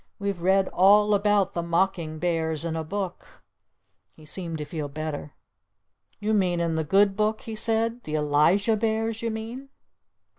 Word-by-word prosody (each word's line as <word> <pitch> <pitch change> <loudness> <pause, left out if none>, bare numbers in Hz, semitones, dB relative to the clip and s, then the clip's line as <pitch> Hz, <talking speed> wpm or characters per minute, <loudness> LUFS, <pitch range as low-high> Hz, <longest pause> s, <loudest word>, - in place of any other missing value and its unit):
We've 200 -4 -3
read 190 +1 +3
all 210 +3 +5
about 205 -1 +2
the 170 - -1
mocking 170 -2 -1
bears 160 -1 -1
in 165 -1 -2
a 160 - -2
book!" 190 +2 -6 0.7
He 155 - -16
seemed 165 0 -4
to 150 - -5
feel 150 0 -5
better. 150 0 -5 0.9
"You 215 +1 -1
mean 180 -4 +1
in 170 -1 0
the 160 0 0
good 195 +5 +3
book?" 215 +1 0
he 225 - -7
said. 225 +2 0
"The 155 - -3
Elijah 155 +9 +3
bears, 225 0 -1
you 230 - -1
mean?" 230 +5 -6
190 Hz, 160 wpm, -25 LUFS, 160-215 Hz, 0.9 s, all